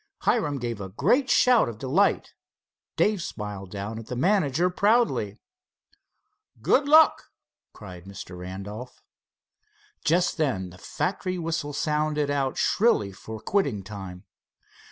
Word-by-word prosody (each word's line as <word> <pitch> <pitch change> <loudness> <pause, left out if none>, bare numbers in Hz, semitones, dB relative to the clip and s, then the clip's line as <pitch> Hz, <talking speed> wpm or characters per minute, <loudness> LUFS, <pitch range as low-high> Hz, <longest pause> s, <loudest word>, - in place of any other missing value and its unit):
Hiram 150 -12 +1
gave 120 -4 -4
a 95 - -6
great 215 - +2
shout 245 - +4
of 115 - -8
delight. 140 - +1 0.6
Dave 210 -3 +2
smiled 105 - -6
down 105 +3 -5
at 115 - -10
the 125 - -4
manager 175 +1 +2
proudly. 205 - +1 1.2
"Good 225 - +2
luck!" 315 +2 +6 0.5
cried 90 -4 -11
Mr. 95 -2 -9
Randolph. 100 +7 -8 1.0
Just 170 +3 +2
then 110 - -1
the 90 - -15
factory 185 - -3
whistle 165 -3 -3
sounded 150 0 0
out 135 -2 -1
shrilly 195 - +2
for 110 +3 -9
quitting 130 - 0
time. 95 -3 -8
135 Hz, 120 wpm, -26 LUFS, -, 1.2 s, luck